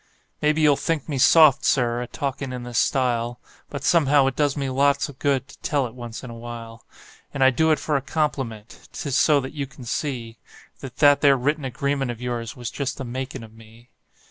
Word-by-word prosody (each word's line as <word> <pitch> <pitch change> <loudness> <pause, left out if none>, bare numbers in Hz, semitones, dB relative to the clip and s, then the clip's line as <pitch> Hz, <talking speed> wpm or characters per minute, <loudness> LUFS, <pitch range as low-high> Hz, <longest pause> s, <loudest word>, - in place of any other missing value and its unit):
Maybe 150 +1 +2
you'll 145 -2 +4
think 165 -4 -2
me 145 -4 -3
soft, 150 0 +6
Sir, 120 -2 +1
a 125 - -5
talkin' 135 +1 -4
in 125 -1 -6
this 120 -1 -1
style, 120 -2 0 0.3
But 140 -2 -6
somehow 145 -5 +4
it 135 -1 -1
does 145 -1 0
me 140 -1 -2
lots 140 +2 +1
of 135 - -13
good 135 -2 0
to 140 - -16
tell 145 -3 0
it 115 - -7
once 120 -2 -8
in 125 - -8
a - - -9
while; 115 -1 -9 0.5
And 135 - +2
I 130 - +6
do 160 +6 +2
it 155 - +4
for 150 - -2
a 140 - +1
compliment 135 -7 -4
'tis 140 -3 -3
so 150 0 +4
that 130 +1 -7
you 140 -2 -4
can 140 -2 -13
see 120 -3 -4 0.4
That 130 -2 -9
that 145 -1 +5
there 140 -2 +5
written 145 +3 -1
agreement 135 +1 -2
of 120 -2 -5
yours 120 -2 -4
was 120 -2 -6
just 140 -1 -3
the 135 - -5
makin' 130 +1 -5
of 110 -1 -13
me. 115 +2 -18
135 Hz, 220 wpm, -23 LUFS, 120-145 Hz, 0.5 s, soft